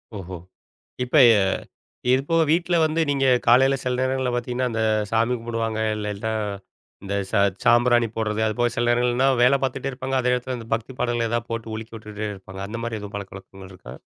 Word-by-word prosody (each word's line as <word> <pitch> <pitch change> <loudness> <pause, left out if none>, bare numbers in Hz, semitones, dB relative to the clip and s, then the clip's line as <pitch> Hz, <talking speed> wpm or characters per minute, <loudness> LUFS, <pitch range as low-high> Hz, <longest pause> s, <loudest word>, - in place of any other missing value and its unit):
ஓஹோ! 95 -2 -7 0.7
இப்ப 125 +5 -1 1.0
இது 130 +1 +4
போக 165 0 +3
வீட்ல 170 +2 +2
வந்து 160 +1 +1
நீங்க 140 -1 +1 0.2
காலையில 135 +3 +5
சில 125 -1 -1
நேரங்கள்ல 130 -1 0
பார்த்தீங்கன்னா, 125 +1 -2
அந்த 115 0 -2 0.3
சாமி 115 +2 +2
கும்பிடுவாங்க 115 -1 -3 0.2
இல்லனா, 105 +1 -3 0.7
இந்த 100 +1 -3 0.2
சா 110 - +2 0.3
சாம்பிராணி 120 0 +4
போடுறது, 110 -1 -1
அதுபோக 120 +3 0
சில 120 0 0
நேரங்கள்லாம் 125 +2 +2
வேலை 130 +3 +5
பார்த்துட்டே 135 +1 -2
இருப்பாங்க. 130 +1 -3
அதே 125 0 +2
இடத்தில 125 0 -3
அந்த 115 -1 -10
பக்தி 115 +3 -8
பாடங்கள் 120 -1 0
ஏதா 120 +1 0
போட்டு 115 -1 -4
ஒலிக்க 110 +1 -8
வுட்டுட்டே 105 0 -6
இருப்பாங்க. 95 0 -10
அந்த 115 +3 -6
மாரி 115 -1 -3
எதுவும் 105 0 -8
பழக்கவழக்கங்கள் 95 -1 -9
இருக்கா? 90 - -11
120 Hz, 170 wpm, -23 LUFS, 110-130 Hz, 1.0 s, காலையில